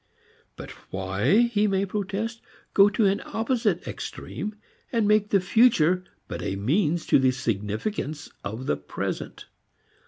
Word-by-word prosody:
But - - -9 0.2
why, 95 - +2
he 220 -3 +2
may 195 0 +1
protest, 210 +3 -3 0.3
go 200 +1 +7
to 210 +1 +1
an 195 +1 +2
opposite 225 -5 -1
extreme 210 0 -6 0.4
and 230 -4 +2
make 210 0 +3
the 200 - +4
future 185 -3 +4 0.2
but - - -5
a 95 - -2
means 155 - +1
to - - +4
the 130 -1 +4
significance 130 - -3 0.2
of 110 +6 -5
the 75 - 0
present? - - -5
195 Hz, 135 wpm, -26 LUFS, 130-215 Hz, 0.4 s, go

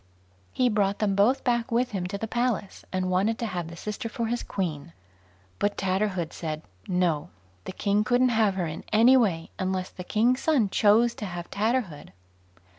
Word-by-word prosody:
He 255 - +2
brought 205 -3 +1
them 210 -2 +1
both 210 +7 +3
back 240 -1 0
with 245 +2 +1
him 185 -3 -2
to 200 - -4
the 225 - -4
Palace, 240 -4 -2
and 185 -1 -1
wanted 200 +5 +1
to 235 - -3
have 180 -6 -3
the 165 - -9
sister 210 +5 -5
for 235 -1 -3
his 240 +2 -1
queen; 170 -4 -4 0.7
but 205 0 0
Tatterhood 185 -3 -1
said 155 -2 -5 0.2
"No"; 175 -5 0 0.4
the - - -5
king 205 +2 +1
couldn't 245 +3 +3
have 220 -4 +2
her 185 -2 -1
in 155 0 -6
any 230 +5 +6
way, 185 -10 +1
unless 185 -1 -2
the 180 - -8
king's 235 +7 +2
son 265 -12 +2
chose 225 +4 +4
to 210 - -6
have 175 -1 -7
Tatterhood. 205 - -1
205 Hz, 185 wpm, -26 LUFS, 185-230 Hz, 0.7 s, any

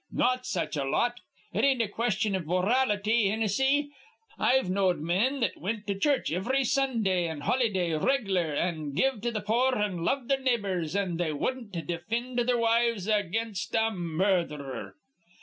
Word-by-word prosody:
Not 255 0 +1
such 170 -3 -2
a 140 - 0
lot. 240 - 0 0.3
It - - 0
ain't 270 -2 +3
a - - -2
question 215 -1 -1
iv 185 -5 -2
morality, 210 +3 +2
Hinnissy. 265 +7 +1 0.5
I've 265 -4 +3
knowed 185 -1 +2
men 200 - 0
that - - 0
wint 210 +3 -3
to 200 - -1
church 270 - +1
ivry 260 +10 +1
Sundah 230 -10 +1
an' 155 -2 -6
holyday 190 - +1
reg'lar, 190 - +1
an' 155 -4 -2
give 260 - +1
to 240 +1 -1
th' 215 -3 -4
poor 250 +4 +2
an' 200 -6 -1
loved 255 +7 0
their 275 -1 +1
neighbors, 200 - -1
an' 190 -4 -1
they 170 -2 0
wudden't 225 - -3
defind 230 - -3
their 250 -1 +3
wives 230 -3 +1
against 215 0 -1
a 225 0 +2
murdherer. 170 - -2
210 Hz, 160 wpm, -28 LUFS, 180-245 Hz, 0.5 s, ain't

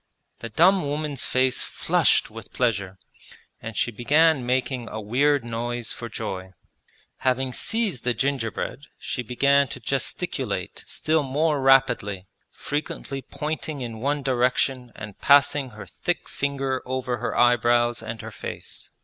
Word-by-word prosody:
The 115 - -6
dumb 180 - +4
woman's 145 -2 -1
face 130 0 +2
flushed - - +2
with - - -10
pleasure, 100 -6 -1 0.6
and 115 -1 -7
she 120 - +1
began 145 +5 +3
making 125 -1 -1
a 110 - -5
weird 130 +5 +2
noise 120 0 -3
for 115 - -7
joy. 95 -4 -5 0.6
Having 130 0 0
seized 220 - -1
the 125 -1 +1
gingerbread 135 0 -2
she 125 - -3
began 140 +4 +3
to 125 - -8
gesticulate 125 - -3
still 155 0 +1
more 145 +2 +1
rapidly, 125 -8 +3 0.2
frequently 140 -2 -4
pointing 150 +1 -4
in 115 -3 -5
one 140 +3 -1
direction 125 -1 +1
and 105 -2 -9
passing 145 -1 +5
her 105 -3 -10
thick - - -3
finger 135 -2 -2
over 130 -1 -2
her 120 - -3
eyebrows 120 -1 +3
and 115 0 -6
her - - -7
face. - - -7
130 Hz, 135 wpm, -25 LUFS, 115-140 Hz, 0.6 s, passing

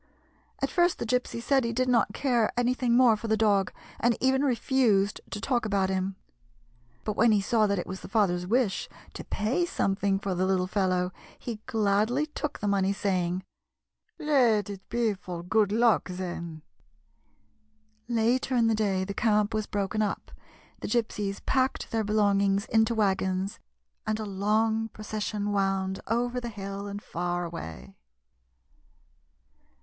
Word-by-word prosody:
At - - 0
first 350 -1 +3
the - - -3
Gypsy 250 0 -1
said 270 +2 +2
he 230 - -1
did 255 +2 +1
not 235 -5 +3
care 240 -2 +1
anything 245 0 +2
more 245 -3 +6
for 220 +2 -6
the 220 0 +2
dog, 200 -3 +2 0.3
and 235 0 +2
even 265 +1 +2
refused 235 -6 +2
to 210 - -5
talk 240 +2 0
about 195 -3 +1
him; 190 0 -1 0.9
but 215 - -2
when 230 +1 +4
he 210 - +4
66 195 - -5
THE - - +2
GYPSY'S - - +4
FLIGHT - - +5
saw 215 - +5
that 200 -2 0
it - - -10
was 190 +1 -5
the - - -9
father's 180 -4 +1
wish 225 -2 +1 0.2
to - - -7
pay 240 +12 0
some 195 - 0
thing 195 0 +1
for 195 -1 -2
the 185 +1 0
little 185 -1 +2
fellow, 185 -2 0 0.3
he 230 -3 -6
gladly 220 +6 +1
took 300 -1 -4
the 205 - -3
money, 195 -1 +2
saying: 185 -2 -1 0.4
" - - -51
Let 240 - +3
it 190 -1 -10
be 230 -2 +1
for 180 -3 -7
good 205 +2 +2
luck, 230 -2 +3
then." 170 -3 -5 1.4
Later 240 +3 +1
in 235 -2 +4
the 225 - +3
day 200 -3 +1
the 200 - -4
camp 210 0 +2
was 215 -1 -1
broken 205 +1 -1
up, 210 - -2 0.5
the - - -5
Gypsies 210 -4 -2
packed 260 0 0
their 225 -1 0
belongings 200 -1 +2
into 220 +1 +2
wagons, 190 -2 0 0.5
and 215 0 0
a 215 - -3
long 215 +3 +1
procession 210 -1 -3
wound 195 -1 0
over 245 +2 0
the 240 - -4
hill 200 -1 -6
and 200 +1 -6
far 175 +1 -2
away. 80 - -8
210 Hz, 170 wpm, -28 LUFS, 195-235 Hz, 1.4 s, more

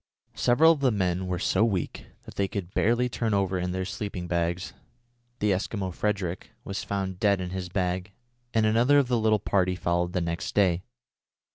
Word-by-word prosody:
Several 155 +7 +5
of 160 - +1
the 135 -2 +3
men 95 -4 0
were 90 -1 -1
so 95 +4 +2
weak 95 -8 -2 0.2
that - - -11
they 100 - 0
could 95 -2 -5
barely 120 +3 +2
turn 115 -3 -1
over 95 -2 +1
in 90 0 -2
their 95 0 -2
sleeping 95 -2 -5
bags. 85 +1 -1 0.6
The 105 -3 +1
Eskimo 95 0 -2
Frederick 95 -3 -2
was 100 0 -4
found 95 -2 -3
dead 100 -2 +3
in 90 -1 -4
his 95 -1 -4
bag, 90 +1 -2 0.4
and 110 -2 +2
another 120 +6 +4
of 140 -3 +3
the 120 -2 +2
little 110 -1 +3
party 95 -2 +1
followed 85 0 0
the - - +1
next 85 +1 -3
day. 95 -4 +3
95 Hz, 185 wpm, -27 LUFS, 90-110 Hz, 0.6 s, Several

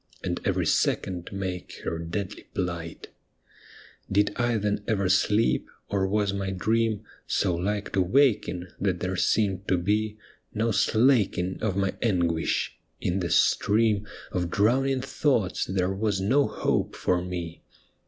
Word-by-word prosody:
And - - -2
every - - +1
second 90 -2 0
make 95 -2 -5
her 80 - -2
deadly 90 +4 -5
phght! 85 -3 -4 1.1
Did 100 +1 +3
I 120 -1 +1
then 105 0 -1
ever 100 -4 +1
sleep, 95 - +2 0.2
or 95 -1 +1
was 100 0 +1
my 100 -1 -2
dream 110 +3 0 0.2
So 95 -3 +1
like 100 +4 -2
to 95 - +3
waking 100 -4 +2
that 95 -3 0
there 95 +1 -2
seemed 95 0 +1
to 95 - +3
be 105 +4 0 0.4
No 115 +2 +1
slaking 110 -5 +2
of 100 -4 -1
my 95 -1 +1
anguish! 85 -7 0 0.2
In 90 +2 -1
the 85 -2 -2
stream 105 +3 +3 0.2
Of 90 -1 -1
drowning 130 +8 +2
thoughts 130 -7 0
there 95 0 0
was 100 -1 0
no 130 +9 +3
hope - - -1
for 90 -1 +1
me. 85 -2 -5
100 Hz, 140 wpm, -26 LUFS, 90-110 Hz, 1.1 s, Did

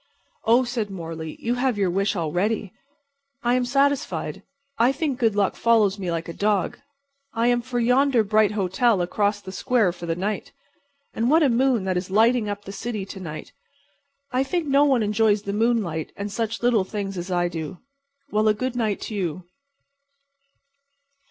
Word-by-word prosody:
"Oh," 235 +3 +5
said 240 -4 -3
Morley, 165 -4 -6
"you 235 - -1
have 250 -2 0
your 195 -3 +1
wish 195 +3 0
already. 185 +5 -1 0.7
I 240 0 +2
am 250 0 +2
satisfied. 275 +2 0 0.4
I 240 +3 +5
think 280 -2 -2
good 225 -4 +2
luck 200 -2 +1
follows 215 -4 +3
me 185 -2 -3
like 165 -1 -2
a 170 - -6
dog. 205 -1 0 0.6
I 230 +1 +1
am 240 0 +2
for 245 0 -3
yonder 250 0 +3
bright 215 0 +3
hotel 200 +1 +2
across 205 +3 0
the 190 - -8
square 220 0 +1
for 175 0 -9
the 165 - 0
night. 200 +4 -3 0.6
And 230 +2 0
what 320 +2 +5
a 285 - +4
moon 245 -2 +2
that 185 -1 0
is 180 +1 -3
lighting 225 +2 +3
up 205 0 -5
the 195 - -7
city 210 0 -4
to 195 - -9
night. 155 -4 -8 0.8
I 255 +1 +2
think 335 +4 -1
no 280 +1 +4
one 260 -5 +3
enjoys 210 0 +2
the 200 - -3
moonlight 210 -8 0
and 200 +1 -4
such 225 +2 -3
little 235 -5 +3
things 195 0 -4
as 175 +1 -5
I 175 -1 +1
do. 165 +1 -5 0.5
Well, 215 +1 +2
a 215 - +4
good 255 +3 -3
night 220 -4 -1
to - - -6
you." 185 -3 -3
210 Hz, 180 wpm, -24 LUFS, 190-240 Hz, 0.8 s, Oh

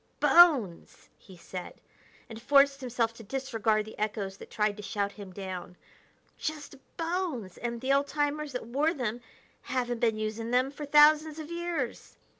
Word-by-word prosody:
"Bones!" 280 - +4
he 190 -2 -16
said, 180 +1 -8 0.5
and 225 -2 -9
forced 275 +1 +4
himself 240 -2 -1
to 230 - -12
disregard 225 -3 -1
the 220 - -11
echoes 205 -2 -3
that - - -12
tried 210 -1 0
to - - -7
shout 200 0 -2
him 200 -2 -10
down; 185 -2 -7 0.6
"just 305 -2 -5 0.2
bones! 330 - -3
And 235 -1 -3
the 265 +1 +2
old 280 +1 +2
timers 295 -1 -2
that 250 - -4
wore 285 +8 0
them 240 -3 -3 0.4
haven't 245 -2 -2
been 225 -2 +1
using 215 +1 -3
them 255 +2 +2
for 290 0 -7
thousands 300 +1 +5
of 315 +1 -7
years." 340 -7 -4
245 Hz, 160 wpm, -29 LUFS, 215-290 Hz, 0.6 s, thousands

